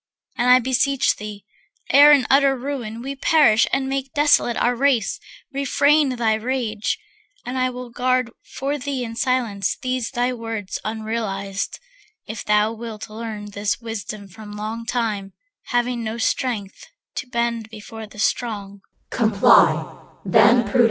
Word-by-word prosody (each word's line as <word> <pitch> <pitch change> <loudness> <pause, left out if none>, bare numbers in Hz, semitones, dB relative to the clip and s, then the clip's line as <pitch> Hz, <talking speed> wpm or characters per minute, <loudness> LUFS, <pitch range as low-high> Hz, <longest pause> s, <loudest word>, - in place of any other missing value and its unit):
And 245 +1 +1
I 250 - +9
beseech 260 +2 +1
thee, 205 -1 -8 0.5
ere 290 +1 +8
in 280 -4 +5
utter 275 0 +4
ruin 240 -4 -5
We 275 +1 -4
perish 275 -6 +4
and 270 0 0
make 270 0 -3
desolate 290 -5 +3
our 245 0 +2
race, 255 -4 +1 0.3
Refrain 280 0 +2
thy 230 -2 +1
rage. 220 -2 -2 0.5
And 250 - -4
I 255 0 +1
will 250 -1 -8
guard 255 0 0
for 280 +2 -4
thee 275 -1 -3
In 230 -1 -6
silence 230 -6 0
these 255 -2 -2
thy 250 0 0
words 225 -5 -5
unrealized; 215 -2 -3 0.5
If 220 - -6
thou 210 +1 +2
wilt 220 -1 -8
learn 215 -2 -6
this 205 -1 -1
wisdom 215 -3 -6
from 210 +2 -11
long 220 +2 -5
time, 215 -6 -2 0.3
Having 245 -1 -1
no 220 +1 -4
strength, 225 -4 -2 0.3
to - - -3
bend 235 -2 -2
before 220 0 -9
the 210 - -16
strong. 205 -3 -2
235 Hz, 135 wpm, -22 LUFS, 215-255 Hz, 0.5 s, I